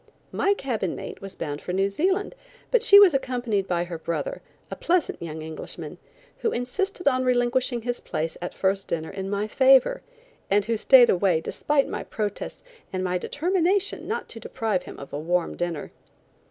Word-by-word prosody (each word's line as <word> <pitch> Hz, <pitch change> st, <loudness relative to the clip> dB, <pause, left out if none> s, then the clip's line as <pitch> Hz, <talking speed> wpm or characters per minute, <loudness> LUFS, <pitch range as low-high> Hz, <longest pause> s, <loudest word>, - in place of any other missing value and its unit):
My 400 Hz, +1 st, +2 dB
cabin 230 Hz, -, -2 dB
mate -, -, -8 dB
was 195 Hz, -1 st, -7 dB
bound 145 Hz, -2 st, -5 dB
for 180 Hz, -, -5 dB
New 195 Hz, +1 st, +2 dB
Zealand, 375 Hz, -, 0 dB, 0.4 s
but -, -, +4 dB
she 400 Hz, -, +9 dB
was 395 Hz, -5 st, +7 dB
accompanied 245 Hz, -7 st, -1 dB
by 175 Hz, -1 st, 0 dB
her 175 Hz, -2 st, -6 dB
brother, -, -, -3 dB, 0.3 s
a -, -, -3 dB
pleasant 350 Hz, -1 st, 0 dB
young 160 Hz, -2 st, -6 dB
Englishman, 160 Hz, 0 st, -7 dB, 0.4 s
who 455 Hz, -, 0 dB
insisted 360 Hz, +8 st, -2 dB
on 255 Hz, -2 st, +3 dB
relinquishing 245 Hz, -1 st, +1 dB
his 245 Hz, 0 st, -2 dB
place 160 Hz, +1 st, -3 dB
at 175 Hz, -, -5 dB
first 195 Hz, 0 st, 0 dB
dinner 160 Hz, -1 st, -3 dB
in 195 Hz, 0 st, -5 dB
my 205 Hz, +1 st, -1 dB
favor, 265 Hz, -, +4 dB, 0.5 s
and 200 Hz, 0 st, +3 dB
who 230 Hz, +1 st, 0 dB
stayed 245 Hz, +2 st, +7 dB
away 180 Hz, -3 st, +2 dB
despite 280 Hz, -, 0 dB
my -, -, -4 dB
protests 210 Hz, -2 st, -5 dB, 0.3 s
and 185 Hz, -1 st, -2 dB
my 180 Hz, -1 st, 0 dB
determination 370 Hz, -, 0 dB
not 470 Hz, +2 st, -3 dB
to 225 Hz, -, -8 dB
deprive 220 Hz, -4 st, -2 dB
him -, -, -10 dB
of 140 Hz, -, -10 dB
a 145 Hz, -, -2 dB
warm 175 Hz, +2 st, -1 dB
dinner. 175 Hz, -4 st, -4 dB
225 Hz, 180 wpm, -25 LUFS, 180-285 Hz, 0.5 s, she